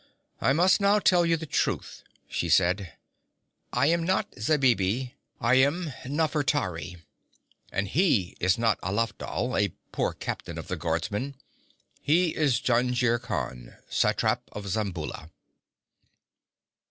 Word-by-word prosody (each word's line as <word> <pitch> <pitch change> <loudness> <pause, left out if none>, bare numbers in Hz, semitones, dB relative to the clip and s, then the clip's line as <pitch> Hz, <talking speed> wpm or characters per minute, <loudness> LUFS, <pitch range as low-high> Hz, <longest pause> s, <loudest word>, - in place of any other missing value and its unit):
'I 135 - +3
must 185 +6 +4
now 200 +1 +4
tell 180 -4 +4
you 165 0 +3
the 160 - -6
truth,' - - -2 0.2
she - - -2
said. 95 +1 +2 0.8
'I - - +2
am 165 +2 +2
not 185 +3 0
Zabibi. 125 -2 +1 0.3
I 120 +2 +3
am 145 +3 +2
Nafertari. 140 - -1 0.7
And 100 +2 -1
he 125 - +2
is 90 +1 +2
not 115 -3 +1
Alafdhal, 115 +5 -2
a 100 -4 -1 0.2
poor - - -1
captain - - -5
of - - -7
the - - -1
guardsmen. 105 +11 -2 0.7
He 165 +2 +2
is 145 -6 +2
Jungir 120 -1 +2
Khan, 60 - -5 0.2
satrap - - +1
of 105 - -6
Zamboula.' 90 -6 -3
125 Hz, 120 wpm, -27 LUFS, 100-155 Hz, 0.8 s, must